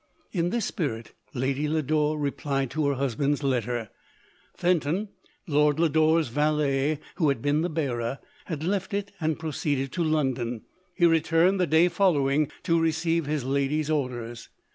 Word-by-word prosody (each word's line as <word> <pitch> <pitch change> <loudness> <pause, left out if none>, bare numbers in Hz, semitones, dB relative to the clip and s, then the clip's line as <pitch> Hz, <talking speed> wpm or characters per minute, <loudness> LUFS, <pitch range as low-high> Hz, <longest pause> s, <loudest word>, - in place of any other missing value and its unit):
In 175 -3 0
this 230 0 -1
spirit 115 - -3 0.2
Lady 135 +4 0
Lodore 155 0 +1
replied 140 -2 -2
to 155 -2 0
her 140 - +1
husband's 140 +2 0
letter. 120 -4 -1 0.7
Fenton, 175 +3 +1 0.4
Lord 150 -2 +2
Lodore's 160 -2 +3
valet, 150 +1 +1 0.2
who 155 -5 +3
had 140 - 0
been 145 +5 +1
the 175 - 0
bearer, 135 -6 -2 0.3
had 155 -3 -4
left 195 +2 -1
it, 205 0 -3
and 160 -1 0
proceeded 145 -4 -2
to 175 - -1
London. 130 -7 -1 0.3
He 175 - +3
returned 165 +3 +3
the 180 - +2
day 160 +4 +5
following, 150 -6 +2
to 165 0 +2
receive 165 0 0
his 150 -3 -1
lady's 140 +3 0
orders. 120 -5 -3
150 Hz, 145 wpm, -26 LUFS, 135-165 Hz, 0.7 s, day